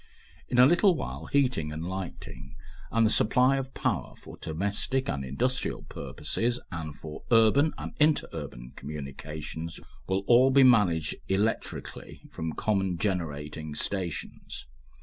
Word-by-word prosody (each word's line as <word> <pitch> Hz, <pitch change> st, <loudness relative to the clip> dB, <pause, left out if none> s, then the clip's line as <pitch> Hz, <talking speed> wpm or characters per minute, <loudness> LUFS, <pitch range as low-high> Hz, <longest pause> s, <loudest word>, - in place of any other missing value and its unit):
In 125 Hz, -, 0 dB
a 125 Hz, -, +9 dB
little 175 Hz, +5 st, +5 dB
while -, -, -5 dB
heating 125 Hz, -, +1 dB
and 80 Hz, +3 st, -4 dB
lighting 95 Hz, -1 st, -7 dB, 0.4 s
and 115 Hz, 0 st, +4 dB
the 110 Hz, -, +3 dB
supply 125 Hz, +6 st, +4 dB
of 135 Hz, -1 st, -5 dB
power -, -, -1 dB
for -, -, -12 dB
domestic 100 Hz, +10 st, -1 dB
and 70 Hz, -, -2 dB
industrial 125 Hz, -, -1 dB
purposes 120 Hz, +11 st, -2 dB
and 80 Hz, -4 st, -5 dB
for 75 Hz, +1 st, -8 dB
urban 115 Hz, +7 st, +5 dB
and -, -, -5 dB
inter 150 Hz, 0 st, +4 dB
urban -, -, -7 dB
communications 75 Hz, +3 st, -6 dB, 0.3 s
will 95 Hz, +1 st, 0 dB
all 125 Hz, +4 st, +6 dB
be 135 Hz, +1 st, +6 dB
managed 90 Hz, -11 st, +4 dB
electrically 100 Hz, +4 st, -2 dB
from 80 Hz, -1 st, -4 dB
common 95 Hz, -4 st, 0 dB
generating 75 Hz, -5 st, -3 dB
stations. 90 Hz, 0 st, -4 dB
95 Hz, 130 wpm, -28 LUFS, 80-125 Hz, 0.4 s, a